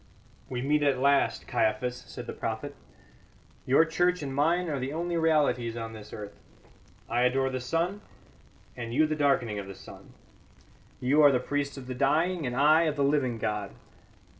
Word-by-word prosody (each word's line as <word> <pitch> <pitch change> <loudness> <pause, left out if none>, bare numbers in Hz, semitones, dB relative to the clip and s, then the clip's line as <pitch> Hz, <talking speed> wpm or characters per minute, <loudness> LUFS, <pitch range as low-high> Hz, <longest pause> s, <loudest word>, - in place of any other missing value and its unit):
"We 125 -1 -3
meet 150 +2 +2
at 140 -2 +2
last, 140 +2 +2
Caiaphas," 115 +3 0
said - - -8
the - - -6
prophet. - - -4 0.9
"Your 140 +5 +5
church 175 +1 +1
and 135 -2 -4
mine 165 +6 +1
are 145 -4 -2
the 130 +2 -3
only 170 +2 -2
realities 145 -8 +1
on 115 -1 -5
this 105 -1 -11
earth. 105 -1 -9 0.7
I 120 +2 0
adore 135 +2 +2
the 130 - -2
sun, 170 +10 -1 0.7
and 115 -1 -5
you 155 +3 +5
the 155 0 -1
darkening 135 -8 +1
of 100 - -7
the 95 - -8
sun; - - -14 0.9
you 140 +5 +3
are 145 -1 +7
the 125 - +2
priest 140 +2 -3
of 135 - -8
the 130 - -5
dying 155 +5 +1
and 125 - -3
I 155 +5 +5
of 155 -2 0
the 140 - 0
living 140 -4 +1
God. 105 -2 -3
140 Hz, 180 wpm, -28 LUFS, 125-155 Hz, 0.9 s, are